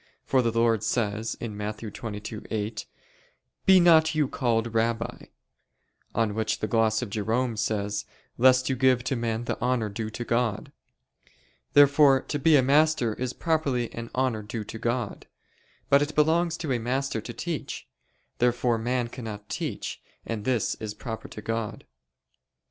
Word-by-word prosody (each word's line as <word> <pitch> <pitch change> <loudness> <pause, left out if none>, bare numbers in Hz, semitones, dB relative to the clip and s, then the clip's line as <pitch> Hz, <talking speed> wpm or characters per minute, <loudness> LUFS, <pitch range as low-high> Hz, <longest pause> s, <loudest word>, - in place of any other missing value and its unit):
For 130 - +3
the 115 -2 +1
Lord 115 -2 +2
says 110 -1 -1
(Matt. 105 -1 -4
22:8): 105 0 -5 0.8
"Be 190 -1 +8
not 160 -2 +5
you 150 -3 +2
called 115 -3 0
Rabbi": 115 0 -1 0.9
on 110 -2 +1
which 110 0 -1
the - - -2
gloss 110 +1 +2
of 110 - -6
Jerome 115 +3 0
says, 105 -1 -1 0.3
"Lest 130 +1 +5
you 130 - +1
give 130 -1 +3
to 135 - -1
men 115 -1 -2
the - - -3
honor 125 -3 +1
due 110 +2 -4
to 120 +2 -6
God." 115 -3 -1 1.0
Therefore 145 -1 +6
to 145 - -4
be 155 +2 +5
a 135 - +5
master 145 -4 +3
is 125 +2 -3
properly 140 -8 0
an 115 0 -6
honor 125 -4 0
due 110 +1 -5
to 115 +2 -8
God. 120 -2 -2 0.6
But 140 0 +5
it 145 +1 -2
belongs 165 +2 +2
to 155 -5 -3
a 120 - 0
master 125 0 -1
to 120 - -7
teach. 155 +7 -5 0.5
Therefore 120 -1 +2
man 120 +1 0
cannot 110 -4 -8
teach, - - -4 0.2
and 110 -3 -4
this 125 -5 +1
is 105 -1 -5
proper 110 0 -6
to 105 - -10
God. 115 -1 -3
115 Hz, 155 wpm, -26 LUFS, 110-130 Hz, 1.0 s, Be